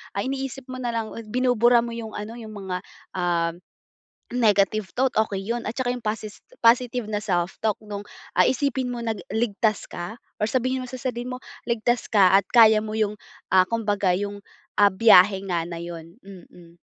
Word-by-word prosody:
ah, -, -, -1 dB
iniisip 270 Hz, -1 st, -4 dB
mo 255 Hz, -, -7 dB
na 240 Hz, -, -1 dB
lang 225 Hz, -1 st, -2 dB
o -, -, -9 dB
binubura 245 Hz, 0 st, +3 dB
mo 235 Hz, -, -5 dB
'yong 225 Hz, -2 st, -6 dB
ano, 210 Hz, +2 st, -6 dB
'yong 220 Hz, -2 st, -9 dB
mga, 190 Hz, -3 st, -4 dB, 0.4 s
uhm, 170 Hz, -2 st, +1 dB, 0.8 s
negative 210 Hz, -3 st, +2 dB
thought, 260 Hz, +1 st, +1 dB
okey 195 Hz, -2 st, -4 dB
'yun. 230 Hz, +4 st, -3 dB
At 220 Hz, -, -3 dB
saka 260 Hz, -2 st, -1 dB
'yung 245 Hz, -, -8 dB
posi 215 Hz, 0 st, -2 dB, 0.4 s
positive 245 Hz, 0 st, +3 dB
na 210 Hz, -1 st, -1 dB
self-talk 190 Hz, +3 st, -1 dB
nung, 205 Hz, -1 st, -6 dB, 0.3 s
ah, -, -, +6 dB
isipin 260 Hz, -1 st, 0 dB
mo 240 Hz, -, -5 dB
na 225 Hz, -1 st, -1 dB, 0.2 s
ligtas 220 Hz, -1 st, 0 dB
ka 175 Hz, +6 st, -6 dB, 0.2 s
or -, -, +2 dB
sabihin 255 Hz, +2 st, 0 dB
mo -, -, -9 dB
sa 255 Hz, -, -6 dB
sarili 245 Hz, -2 st, -3 dB
mo 250 Hz, -, -5 dB, 0.3 s
ligtas 235 Hz, +1 st, 0 dB
ka 195 Hz, -3 st, +6 dB
at 200 Hz, -, -1 dB
kaya 220 Hz, -3 st, +7 dB
mo 215 Hz, -, -5 dB
'yung, 210 Hz, -1 st, +1 dB, 0.4 s
ah, 185 Hz, -1 st, +6 dB
kumbaga 205 Hz, -5 st, +1 dB
'yung, 205 Hz, +1 st, -4 dB, 0.4 s
ah, 205 Hz, 0 st, +6 dB
biyahe 195 Hz, -1 st, +6 dB
nga 170 Hz, -2 st, 0 dB
na 170 Hz, -, -6 dB
'yun. 170 Hz, 0 st, -9 dB
Mm. 175 Hz, -3 st, -15 dB
215 Hz, 185 wpm, -24 LUFS, 195-240 Hz, 0.8 s, kaya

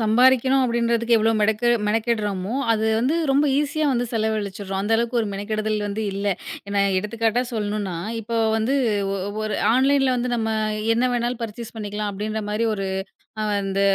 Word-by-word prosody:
சம்பாறிக்கணும் 260 Hz, +4 st, +4 dB
அப்படின்றதுக்கு 235 Hz, -1 st, +1 dB
எவ்வளவு 220 Hz, 0 st, +2 dB
மெடெக்கெட் 220 Hz, +3 st, +3 dB
மெனக்கெடுறமோ, 215 Hz, -2 st, -1 dB, 0.2 s
அது 220 Hz, 0 st, 0 dB
வந்து 255 Hz, +7 st, +1 dB, 0.2 s
ரொம்ப 280 Hz, +2 st, +3 dB
ஈஸியா 295 Hz, +1 st, 0 dB
வந்து 245 Hz, 0 st, 0 dB
செலவழிச்சிறோம். 205 Hz, -3 st, -2 dB
அந்த 210 Hz, +3 st, -1 dB
அளவுக்கு 235 Hz, +1 st, 0 dB
ஒரு 215 Hz, -, -2 dB
மெனக்கெடுதல் 215 Hz, +2 st, -2 dB
வந்து 210 Hz, +2 st, -3 dB
இல்ல. 200 Hz, +1 st, -3 dB, 0.4 s
ஏனா 200 Hz, 0 st, +1 dB, 0.2 s
எடுத்துக்காட்டா 225 Hz, +3 st, 0 dB
சொல்லணுனா 205 Hz, -3 st, -2 dB, 0.3 s
இப்போ 230 Hz, +1 st, -4 dB, 0.2 s
வந்து 225 Hz, +5 st, +1 dB, 0.4 s
ஒ -, -, -2 dB, 0.3 s
ஒரு 215 Hz, -1 st, -2 dB, 0.2 s
ஆன்லைன்ல 270 Hz, +1 st, +3 dB
வந்து 245 Hz, 0 st, -1 dB
நம்ம 225 Hz, -1 st, -1 dB, 0.5 s
என்ன 250 Hz, +2 st, +2 dB
வேணாலும் 240 Hz, 0 st, -1 dB
பர்சேஸ் 230 Hz, +1 st, -8 dB
பண்ணிக்கலாம் 210 Hz, -1 st, -3 dB
அப்படின்ற 215 Hz, +2 st, -3 dB
மாரி 220 Hz, +2 st, 0 dB
ஒரு 195 Hz, -1 st, -3 dB, 0.5 s
அ -, -, 0 dB, 0.2 s
அந்த 195 Hz, 0 st, -1 dB
220 Hz, 155 wpm, -23 LUFS, 210-240 Hz, 0.5 s, சம்பாறிக்கணும்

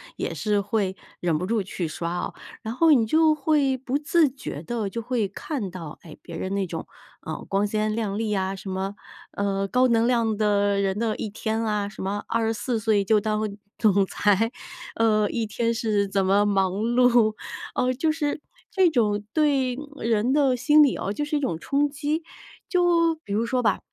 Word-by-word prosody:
也 -, -, -3 dB
是 210 Hz, -1 st, 0 dB
会 200 Hz, -2 st, -1 dB, 0.2 s
忍 170 Hz, -3 st, +1 dB
不 180 Hz, -, -3 dB
住 220 Hz, +2 st, 0 dB
去 180 Hz, -2 st, -4 dB
刷 170 Hz, +2 st, -4 dB
哦。 -, -, -4 dB, 0.3 s
然 220 Hz, +1 st, -4 dB
后 325 Hz, +5 st, +4 dB
你 245 Hz, -6 st, +5 dB
就 315 Hz, +5 st, +4 dB
会 290 Hz, -2 st, +2 dB
不 260 Hz, +2 st, -2 dB
自 320 Hz, 0 st, +3 dB
觉 255 Hz, -, -7 dB
地 220 Hz, +1 st, -3 dB
就 230 Hz, +3 st, -4 dB
会 230 Hz, -3 st, -1 dB
看 205 Hz, -, -5 dB
到， 165 Hz, -4 st, -8 dB
哎， 160 Hz, -, -11 dB
别 -, -, -8 dB
人 190 Hz, +1 st, -3 dB
那 195 Hz, -, 0 dB
种， -, -, -6 dB, 0.3 s
呃， -, -, -5 dB
光 195 Hz, +1 st, +1 dB
鲜 215 Hz, +1 st, -1 dB
亮 210 Hz, -3 st, -2 dB
丽 220 Hz, -1 st, -1 dB
啊， 190 Hz, -1 st, -1 dB
什 190 Hz, 0 st, -8 dB
么， 190 Hz, +2 st, -3 dB, 0.4 s
呃， 195 Hz, -1 st, -1 dB
高 250 Hz, +4 st, +3 dB
能 230 Hz, -1 st, +3 dB
量 230 Hz, -3 st, +2 dB
的 205 Hz, -1 st, +2 dB
人 195 Hz, 0 st, 0 dB
的 225 Hz, -1 st, 0 dB
一 215 Hz, -, -4 dB
天 220 Hz, +2 st, -2 dB
啊， 210 Hz, -2 st, -1 dB
什 205 Hz, -, -10 dB
么 200 Hz, +2 st, -2 dB
24 225 Hz, +1 st, -1 dB
岁 215 Hz, -2 st, +2 dB
就 215 Hz, +1 st, +3 dB
当 215 Hz, 0 st, -1 dB, 0.4 s
总 200 Hz, -3 st, +3 dB
裁。 210 Hz, +4 st, +2 dB, 0.4 s
呃， 215 Hz, -2 st, +3 dB
一 230 Hz, -2 st, -1 dB
天 230 Hz, +2 st, -1 dB
是 215 Hz, -3 st, 0 dB
怎 195 Hz, 0 st, 0 dB
么 200 Hz, +2 st, +3 dB
忙 195 Hz, -2 st, +2 dB
碌， 235 Hz, +1 st, +3 dB, 0.4 s
呃， 250 Hz, -, +2 dB
就 310 Hz, +5 st, +1 dB
是 300 Hz, -2 st, -2 dB, 0.3 s
这 380 Hz, -3 st, +4 dB
种 210 Hz, -6 st, +1 dB
对 275 Hz, -5 st, +2 dB, 0.2 s
人 230 Hz, +1 st, +1 dB
的 280 Hz, -3 st, +3 dB
心 295 Hz, +5 st, +5 dB
理 280 Hz, -, +3 dB
啊， 195 Hz, -, -3 dB
就 295 Hz, -, -2 dB
是 300 Hz, -, -2 dB
一 -, -, 0 dB
种 260 Hz, -, -1 dB
冲 285 Hz, -, +1 dB
击。 295 Hz, +3 st, -2 dB, 0.5 s
就 345 Hz, -2 st, +3 dB
比 200 Hz, -, -5 dB
如 215 Hz, +3 st, +1 dB
说 250 Hz, +1 st, 0 dB
吧， -, -, +2 dB
220 Hz, 205 characters per minute, -25 LUFS, 200-255 Hz, 0.5 s, 你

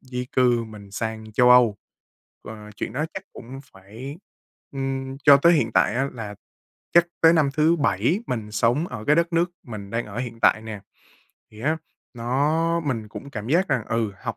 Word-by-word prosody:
di 125 Hz, -1 st, -5 dB
cư 120 Hz, -2 st, +3 dB
mình 105 Hz, -2 st, -12 dB
sang 110 Hz, +1 st, -5 dB
châu 125 Hz, +2 st, +5 dB
Âu. 120 Hz, -4 st, +6 dB, 0.7 s
Ờ, 105 Hz, -1 st, -10 dB
chuyện -, -, -4 dB
đó 150 Hz, +4 st, -1 dB
chắc 190 Hz, -, -5 dB
cũng 130 Hz, +3 st, -10 dB
phải 110 Hz, -, -10 dB, 0.5 s
ừm, 135 Hz, -1 st, -3 dB
cho 145 Hz, -2 st, +9 dB
tới 170 Hz, +5 st, +5 dB
hiện 115 Hz, -9 st, +1 dB
tại 110 Hz, -, +3 dB
á, 135 Hz, +2 st, 0 dB
là 110 Hz, -4 st, -7 dB, 0.6 s
chắc 170 Hz, 0 st, +6 dB
tới 165 Hz, 0 st, +7 dB
năm 155 Hz, -4 st, +3 dB
thứ 160 Hz, +3 st, +4 dB
7 165 Hz, +5 st, +1 dB
mình 110 Hz, -4 st, -4 dB
sống 120 Hz, +9 st, +1 dB
ở 105 Hz, -, -7 dB
cái 150 Hz, +4 st, +3 dB
đất 170 Hz, +1 st, +1 dB
nước 170 Hz, +1 st, +2 dB
mình 105 Hz, -4 st, -8 dB
đang 115 Hz, 0 st, -2 dB
ở 105 Hz, +2 st, -7 dB
hiện 115 Hz, -2 st, -5 dB
tại 110 Hz, -, +4 dB
nè, 110 Hz, -2 st, -7 dB, 0.7 s
thì 110 Hz, 0 st, -14 dB
á, 155 Hz, +5 st, +1 dB, 0.4 s
nó 150 Hz, +8 st, 0 dB
mình 125 Hz, -9 st, -3 dB
cũng 140 Hz, +6 st, -9 dB
cảm 110 Hz, -3 st, -6 dB
giác 180 Hz, +6 st, +2 dB
rằng, 115 Hz, -5 st, 0 dB
ừ, 115 Hz, -2 st, -1 dB
học -, -, -4 dB
125 Hz, 190 wpm, -24 LUFS, 110-150 Hz, 0.7 s, cho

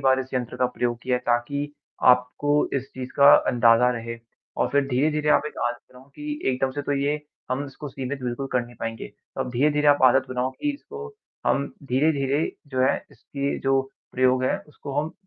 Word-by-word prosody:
बार 130 Hz, 0 st, +3 dB
इस 130 Hz, -, -7 dB
यंत्र 125 Hz, 0 st, -2 dB
का 125 Hz, -, +2 dB
प्रयोग 120 Hz, -1 st, -2 dB
किया 125 Hz, -1 st, +1 dB
है, 125 Hz, -, -4 dB
ताकि 140 Hz, +5 st, 0 dB, 0.3 s
आपको 125 Hz, +4 st, +3 dB
इस 135 Hz, 0 st, -4 dB
चीज़ 130 Hz, -1 st, -6 dB
का 140 Hz, 0 st, +9 dB, 0.2 s
अंदाज़ा 120 Hz, 0 st, +5 dB
रहे। 115 Hz, -1 st, -5 dB, 0.4 s
और -, -, +1 dB
फिर 140 Hz, -1 st, +2 dB
धीरे-धीरे 150 Hz, +3 st, +1 dB
आप -, -, +4 dB
एक 150 Hz, -, -8 dB
आदत 120 Hz, 0 st, -3 dB
बनाओ 130 Hz, +2 st, -16 dB
कि 150 Hz, 0 st, -5 dB
एकदम 130 Hz, +1 st, 0 dB
से 145 Hz, +2 st, -4 dB
तो 145 Hz, -, -1 dB
ये 145 Hz, +2 st, 0 dB, 0.3 s
हम 130 Hz, +3 st, -1 dB
इसको 145 Hz, +2 st, -8 dB
सीमित 135 Hz, 0 st, -5 dB
बिल्कुल 125 Hz, +2 st, -3 dB
कर 125 Hz, -, +3 dB
नहीं 120 Hz, 0 st, -14 dB
पाएँगे, 115 Hz, 0 st, -4 dB
तो -, -, -11 dB
अब 130 Hz, -1 st, -2 dB
धीरे-धीरे 150 Hz, +4 st, +2 dB
आप 145 Hz, -2 st, +4 dB
आदत 130 Hz, +1 st, +5 dB
बनाओ 130 Hz, 0 st, -1 dB
कि 290 Hz, -, -2 dB
इसको 445 Hz, +9 st, -9 dB, 0.4 s
हम 140 Hz, -, +2 dB, 0.2 s
धीरे-धीरे 140 Hz, +2 st, +1 dB, 0.3 s
जो 130 Hz, -, -1 dB
है 130 Hz, -, +3 dB
इसकी 140 Hz, 0 st, -4 dB
जो 135 Hz, 0 st, +2 dB, 0.3 s
प्रयोग 130 Hz, 0 st, +3 dB
है, -, -, +1 dB
उसको 145 Hz, -1 st, -9 dB
हम 155 Hz, +2 st, -5 dB
130 Hz, 200 wpm, -24 LUFS, 125-145 Hz, 0.4 s, का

